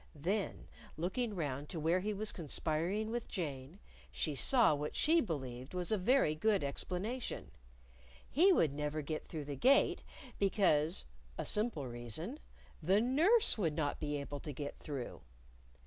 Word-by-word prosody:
Then 190 +8 -2 0.3
looking 205 +7 -1
round 145 -4 -3
to 165 - -4
where 165 +4 +2
he 210 +3 -2
was 210 +1 -2
conspiring 170 +6 -1
with 240 0 -3
Jane, 145 -3 -5 0.3
she 155 - -1
saw 235 - +4
what 150 +1 -3
she 325 +2 +4
believed 130 - -5
was 180 +2 -2
a 215 - +3
very 230 - +4
good 200 +4 +2
explanation: 190 - -3 0.8
He 360 +8 +5
would 160 - +3
never 150 +1 -2
even - - -11
get 155 +1 -4
through 155 -3 -5
the 145 0 -4
Gate 270 - +4 0.4
because 180 -5 +2 0.3
(a - - -3
simple 210 - -1
reason!) 120 - -5 0.4
the 185 +6 +4
nurse 315 - +4
would 165 -6 +1
not 150 -2 -1
be 150 -1 -2
able 145 0 -5
to 150 - -6
get 145 +1 -5
through. 140 -5 -5
165 Hz, 155 wpm, -35 LUFS, 145-215 Hz, 0.8 s, He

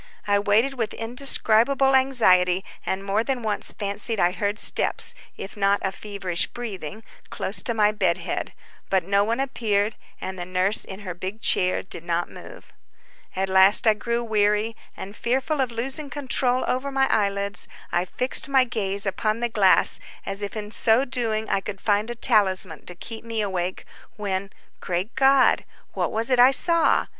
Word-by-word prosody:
I 205 0 +2
waited 225 +6 +1
with 225 - -2
indescribable 250 +2 +2
anxiety, 190 -9 +3 0.2
and 190 +1 -2
more 200 +3 0
than 255 -1 -3
once 210 -2 -1
fancied 205 +2 -4
I 175 - +3
heard 205 +2 -2
steps, - - +2 0.2
if 195 - -8
not 200 -1 +2
a 190 - -1
feverish 195 -4 -2
breathing 215 -4 -7 0.3
close 190 -1 -2
to 235 - -2
my 210 -1 +3
bed 190 -5 0
head; - - -4 0.4
but 190 -2 +1
no 200 +3 +2
one 230 +4 -2
appeared, 220 -6 -1 0.2
and 190 -1 -6
the - - -3
nurse 185 +3 +3
in 190 +2 -9
her 185 -3 -6
big 185 +5 -7
chair 185 -4 +1
did 170 - -3
not 170 0 -2
move. - - -13 0.6
At 190 +1 -1
last 190 +3 +6
I 220 - +5
grew 235 +2 -3
weary, 210 0 0 0.2
and 200 +2 -8
fearful 265 +6 -1
of 255 -2 -1
losing 270 +5 -3
control 255 -2 -1
over 265 +2 -2
my 270 0 +2
eyelids, 200 -2 0 0.2
I 175 +1 0
fixed 255 +8 -1
my 265 -2 +4
gaze 200 -5 -2
upon 215 +3 -1
the 240 0 -1
glass, 200 -4 +4 0.3
as 195 +1 -3
if 205 +2 -5
in 210 0 -6
so 230 +4 +3
doing 225 -4 -2
I 195 - 0
should 200 -2 -6
find 210 +2 0
a 240 - -5
talisman 190 -8 +2
to 180 - -6
keep 225 +5 -8
me 230 -1 -3
awake, 185 -3 -3 0.3
when, 195 -2 -3 0.3
great 180 +5 -3
God! 270 0 +4 0.3
what - - -2
was 225 +3 -1
it 250 - +3
I 250 +1 +8
saw! 335 +5 +3
210 Hz, 175 wpm, -23 LUFS, 195-240 Hz, 0.6 s, I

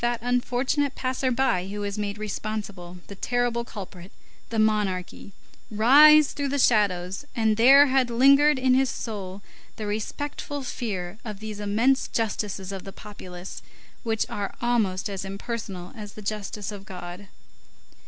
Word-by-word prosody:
that 240 0 +1
unfortunate 250 +3 0
passer 260 0 -1
by 240 -8 +1
who 205 +1 -5
was 200 -1 -3
made 205 -1 -3
responsible, 205 -4 -5
the - - -9
terrible 240 +3 -1
culprit, 190 -5 -9 0.4
the 230 - -3
monarchy, 205 -4 0 0.4
rise 285 +7 +7
through 285 -1 -2
the 280 +1 -1
shadows; 195 -5 +2
and 220 -2 +2
there 270 +6 +8
had 265 -2 +2
lingered 275 +4 +5
in 255 0 +3
his 265 0 +3
soul 200 -5 -6 0.3
the 215 - -5
respectful 280 +7 -4
fear 205 -6 -4
of 210 -4 -7
these 215 -1 -7
immense 225 +7 +2
justices 205 -4 -3
of 195 -2 -6
the 195 - -8
populace, 185 -3 -10 0.4
which 225 -2 0
are 200 -1 -4
almost 220 -6 0
as 195 -2 -5
impersonal 195 -2 -6
as 210 -2 -8
the 215 - -10
justice 210 0 -4
of 200 -2 -8
God. 180 +1 -9
215 Hz, 145 wpm, -25 LUFS, 195-245 Hz, 0.4 s, there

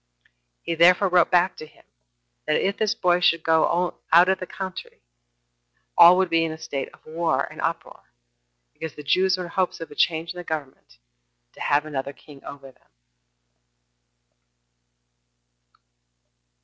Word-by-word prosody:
He 170 - -3
therefore 180 +4 +4
wrote 180 -1 +3
back 180 +1 +2
to 155 - -10
him, 150 - -24 0.6
that 155 - +1
if 200 +1 -1
this 215 -2 -1
boy 180 -1 +1
should 165 -2 +2
only 160 -1 +3 0.2
go - - -34
out 175 +3 +6
of 190 0 +1
the 185 - -7
country, 185 -1 -8 1.0
all 175 +2 +8
would 190 0 +2
be 165 0 +2
in 165 - -2
a 160 - -7
state 140 -3 -5
of - - -22
war 165 +1 -1
and - - -8
uproar, - - -4 0.7
because 160 -2 -8
the 150 - -10
Jews 185 +6 +2
were 180 - -5
in 170 - -9
hopes 185 -1 -1
of 165 - -9
a - - -11
change 165 +2 0
in - - -14
the - - -7
government, 145 - -7 0.5
and - - -51
to - - -14
have 145 +1 +1
another 140 -2 -5
king 140 -1 -17
over 135 -1 -11
them. - - -34
165 Hz, 165 wpm, -23 LUFS, 155-180 Hz, 1.0 s, all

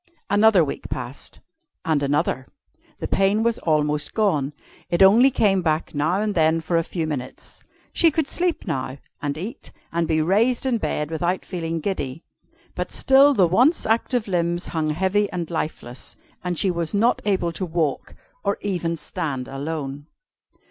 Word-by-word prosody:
Another 205 -4 +5
week 140 - -6
passed, 125 +2 -7 0.4
and 155 -3 +1
another. 140 -2 0 0.5
The - - -4
pain 195 +3 +2
was 235 -1 +1
almost 150 -2 0
gone. 155 -11 +1 0.4
It 175 +2 +4
only 225 +8 +7
came 200 -7 +2
back 160 -2 -1
now 155 +6 +1
and 210 -1 -1
then 160 -1 +3
for 165 +2 -2
a 165 - +3
few 165 -1 -3
minutes. 135 -5 -7 0.3
She 335 - +5
could 315 -1 0
sleep 355 -1 -1
now, 135 -6 -3 0.2
and 145 -1 -2
eat, 220 - -7 0.2
and 170 0 0
be 160 -1 +1
raised 220 +11 +2
in 245 -3 +1
bed 150 -5 -2
without 175 +3 -1
feeling 165 -3 -3
giddy. 155 -5 -3 0.5
But - - -4
still 275 +1 +5
the 185 -5 +5
once 250 - +3
active 230 +1 0
limbs 175 -1 -1
hung 155 -2 -1
heavy 190 +6 +1
and 175 -3 -4
lifeless, 135 -6 -5 0.3
and 180 -2 -2
she 190 - +2
was 170 +2 -2
not 230 +4 +2
able 185 -4 0
to 175 - -5
walk, 160 -4 -2 0.3
or 200 0 0
even 175 -4 -1
stand 150 -6 -4
alone. 145 0 -5
170 Hz, 160 wpm, -23 LUFS, 155-205 Hz, 0.5 s, only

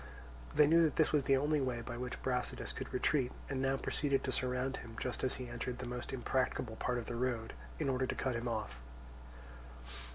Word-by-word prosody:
They 150 0 +8
knew 165 +3 +6
that 160 -3 +3
this 155 - +4
was 145 -3 +3
the 135 - +5
only 150 +2 +2
way 125 -3 -1
by 120 0 -5
which 125 +1 -4
Brasidas 125 -1 -1
could - - -5
retreat, 130 0 +2 0.2
and 130 -1 0
now 135 0 +2
proceeded 140 0 +1
to 130 - -1
surround 125 +1 0
him 115 -1 -9
just 125 - -3
as 130 - +2
he 125 - -5
entered 120 +1 -3
the 130 - -5
most 125 0 -4
impracticable 130 -2 0
part 125 0 0
of 120 - -3
the - - -4
road, 120 -2 -1 0.2
in - - -1
order 130 -1 +1
to - - -1
cut 130 -3 0
him 120 +1 -2
off. 105 - -3
125 Hz, 215 wpm, -35 LUFS, 120-135 Hz, 0.2 s, They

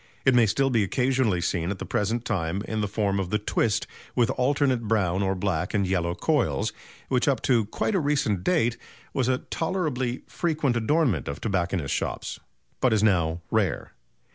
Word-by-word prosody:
It 135 - +5
may 120 -2 +5
still 135 +6 +1
be 115 -3 +3
occasionally 125 -3 +1
seen 85 -1 -1
at 100 - -2
the - - -6
present 115 +4 -1
time 95 -3 -1
in 110 -1 -1
the 105 - 0
form 100 -1 0
of 95 -2 -2
the 105 - +1
"twist" 105 0 0 0.3
with 120 -3 +3
alternate 130 -3 +1
brown 100 -4 +1
or 95 0 +1
black 90 0 -1
and 100 -2 +2
yellow 90 -2 0
coils, - - 0 0.3
which 125 +1 +1
up 140 -2 +3
to 120 -5 +3
quite 110 - -2
a 190 - +3
recent 135 - 0
date 120 -10 +2 0.4
was 130 -3 +1
a 130 -1 +2
tolerably 145 -8 -1
frequent 155 -7 -1
adornment 120 - +1
of 70 +1 -4
tobacconists' 90 -7 -1
shops, - - -3 0.4
but 125 -3 +3
is 105 -1 +2
now 85 -5 +2
rare. - - 0
110 Hz, 180 wpm, -26 LUFS, 95-130 Hz, 0.4 s, It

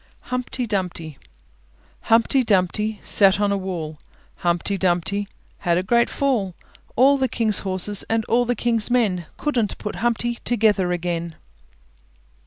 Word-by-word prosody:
HUMPTY 250 0 -2
DUMPTY 180 - -4 0.9
Humpty 230 +4 +4
Dumpty 210 +1 +1
sat 195 -1 +4
on 205 -1 +1
a - - +1
wall; 170 -6 -5 0.4
Humpty 175 +3 0
Dumpty 190 +2 0 0.3
had 170 -2 +1
a 180 - 0
great 235 +5 +2
fall; 230 -10 -1 0.4
All 275 +3 +5
the 260 - +2
King's 220 -3 +1
horses 190 +1 0
and 225 -1 0
all 245 +1 +2
the 245 +1 0
King's 230 -2 0
men 200 -9 +1
Couldn't 240 -9 -1
put 210 - -6
Humpty 240 0 0
Dumpty 235 - -14
together 210 -6 +2
again. 170 -1 -3
205 Hz, 140 wpm, -22 LUFS, 180-235 Hz, 0.9 s, All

